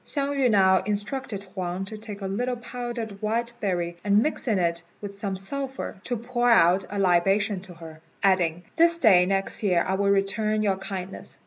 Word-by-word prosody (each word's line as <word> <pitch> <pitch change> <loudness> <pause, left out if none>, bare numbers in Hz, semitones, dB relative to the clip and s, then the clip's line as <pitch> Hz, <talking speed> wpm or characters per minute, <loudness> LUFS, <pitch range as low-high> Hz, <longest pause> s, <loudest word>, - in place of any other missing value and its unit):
Hsiang 280 -1 -2
yü 270 -3 +2
now 190 -3 +4
instructed 210 +2 -3
Huang 185 -1 -3
to 215 - -8
take 210 -1 -9
a - - -4
little 245 +6 -1
powdered 235 -3 -6
white 230 +2 -1
berry, 175 -4 -2
and 205 +1 +4
mixing 245 -8 -1
it 170 -1 0 0.2
with 200 -1 -7
some 200 -1 -3
sulphur, 265 +8 -4
to 245 - -1
pour 240 +1 0
out 185 -4 +5
a 205 - -5
libation 195 +2 +2
to 180 -1 -13
her, 160 -1 -11 0.2
adding, 175 -3 +2
"This 335 0 +5
day 190 - +5
next 195 0 -1
year 180 -5 +2
I 190 - 0
will 200 +1 +1
return 215 +2 +1
your 195 -2 +1
kindness." 190 -1 -6
200 Hz, 185 wpm, -25 LUFS, 190-235 Hz, 0.2 s, out